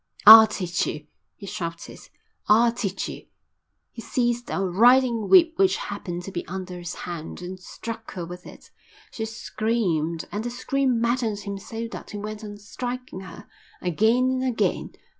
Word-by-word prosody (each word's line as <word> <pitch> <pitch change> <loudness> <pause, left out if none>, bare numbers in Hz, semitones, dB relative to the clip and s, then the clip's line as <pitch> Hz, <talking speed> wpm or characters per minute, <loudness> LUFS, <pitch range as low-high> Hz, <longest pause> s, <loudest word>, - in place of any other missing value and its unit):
"I'll 220 +1 +12
teach 180 -5 -2
you," 150 -1 -5 0.3
he 200 - -11
shouted. 170 -4 -6 0.5
"I'll 230 +3 +5
teach 205 -5 -3
you." - - -9 0.6
He 230 - -9
seized 240 +1 -1
a - - -2
riding 230 +4 +4
whip 335 -3 +7
which 385 -1 +4
happened 175 0 -5
to 195 - -7
be 175 - -4
under 185 -1 -6
his 175 0 -6
hand, 170 -3 -6
and 185 +1 -7
struck 225 +4 -8
her 175 -2 -5
with 180 +1 -10
it. - - -14 0.4
She 220 - -4
screamed, 210 -7 -2
and 210 +1 -3
the 240 - -3
scream 255 0 0
maddened 235 -3 0
him 200 -1 -5
so 225 +3 -6
that - - -9
he 210 - -6
went 215 +1 -6
on 205 -1 -8
striking 245 +1 -6
her, 185 -3 -11 0.3
again 225 +9 +2
and 260 0 -1
again. 255 -3 0
215 Hz, 165 wpm, -24 LUFS, 180-240 Hz, 0.6 s, I'll